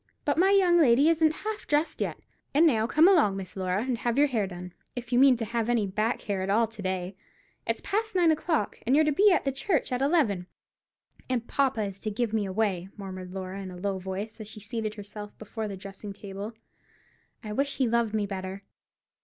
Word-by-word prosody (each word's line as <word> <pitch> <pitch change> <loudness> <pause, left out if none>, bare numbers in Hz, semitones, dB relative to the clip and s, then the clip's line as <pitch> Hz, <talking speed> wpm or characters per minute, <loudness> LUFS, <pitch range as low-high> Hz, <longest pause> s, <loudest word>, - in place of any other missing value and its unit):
But 290 +2 +1
my 380 +2 +5
young 370 -3 +5
lady 275 +1 +5
isn't 320 -1 +4
half 435 0 -4
dressed 295 +2 0
yet. - - -1 0.4
And 315 +3 +6
now, 225 -8 +3
come 310 +8 +5
along, 300 - +4
Miss 185 -2 -7
Laura, 185 +2 -1
and 250 -2 -2
have 240 +1 -1
your 290 - +6
hair 230 -8 0
done, 180 -1 -8 0.2
if 245 0 -5
you 245 - +5
mean 265 -2 +6
to 225 - -3
have 230 +1 -2
any 235 -4 +2
back 215 +5 -1
hair 200 -3 -2
at 190 - -2
all 225 +3 +4
to 225 -1 -10
day. 185 0 -3 0.5
It's - - -1
past 435 +1 -2
nine 345 -3 +5
o'clock, 315 - -1
and 255 +4 +2
you're 310 +1 +5
to 305 - +2
be 400 +8 +5
at 355 - +3
the 275 - +1
church 270 +3 -1
at 250 +1 -1
eleven." 270 - +2 0.8
"And 240 -2 -1
papa 265 -5 +1
is 195 -1 -5
to 215 - -3
give 225 +1 -2
me 210 -3 0
away!" 190 -2 -1
murmured 185 -2 -7
Laura, 190 +1 -5
in 190 - -6
a 180 - -9
low 195 +1 -2
voice, 190 +4 -5
as 215 - -7
she 215 0 -9
seated 215 0 -4
herself 205 0 -9
before 220 +1 -5
the 200 -2 -6
dressing 195 +1 -8
table. 200 +2 -7 0.9
"I 210 -1 -5
wish 280 +4 0
he 260 - +1
loved 230 -2 +1
me 210 -1 +1
better." 190 0 -6
220 Hz, 220 wpm, -28 LUFS, 195-275 Hz, 0.9 s, And